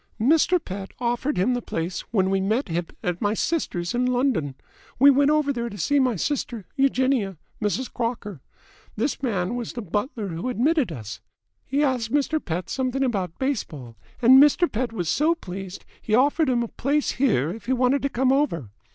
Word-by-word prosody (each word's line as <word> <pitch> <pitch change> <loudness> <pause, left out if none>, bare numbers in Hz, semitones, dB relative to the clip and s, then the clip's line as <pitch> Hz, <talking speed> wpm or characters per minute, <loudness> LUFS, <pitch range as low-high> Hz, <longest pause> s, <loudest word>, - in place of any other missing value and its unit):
"Mr. 315 +9 +4
Pett 195 - -7
offered 245 +4 -1
him 195 +8 +2
the 245 - -1
place 170 -3 -3
when 190 -4 +1
we 195 0 +1
met 215 +5 0
him 170 0 -2 0.2
at 180 -3 -2
my 205 0 +1
sister's 185 - -1
in 250 +1 +1
London. 245 - 0 0.4
We 280 +3 +7
went 280 +1 +3
over 300 -2 +2
there 235 -2 -3
to 205 - -9
see 285 - +2
my 255 -3 +2
sister, 235 - -3
Eugenia 260 -7 +1 0.2
Mrs. 220 +5 -2
Crocker. 230 - -4 0.5
This 255 +7 -1
man 200 -6 -1
was 240 -1 -4
the 240 - -5
butler 205 - -3
who 170 +9 -4
admitted 255 - +1
us. 110 -7 -7 0.5
He 280 +3 +1
asked 250 -5 0
Mr. 290 +2 +1
Pett 175 +2 -3
something 260 0 -1
about 195 -9 -2
baseball, 155 - -3 0.3
and 260 +3 +8
Mr. 295 +4 +5
Pett 240 -1 -2
was 180 -7 -3
so 310 - +2
pleased 190 - -8
that - - -28
he 215 - +1
offered 285 +4 +3
him 240 -2 +2
a - - -3
place 285 +6 0
here 170 - +1
if 225 +5 -9
he 260 - +2
wanted 255 +2 +2
to 280 - 0
come 260 0 +1
over. 170 - 0
240 Hz, 190 wpm, -24 LUFS, 195-275 Hz, 0.5 s, and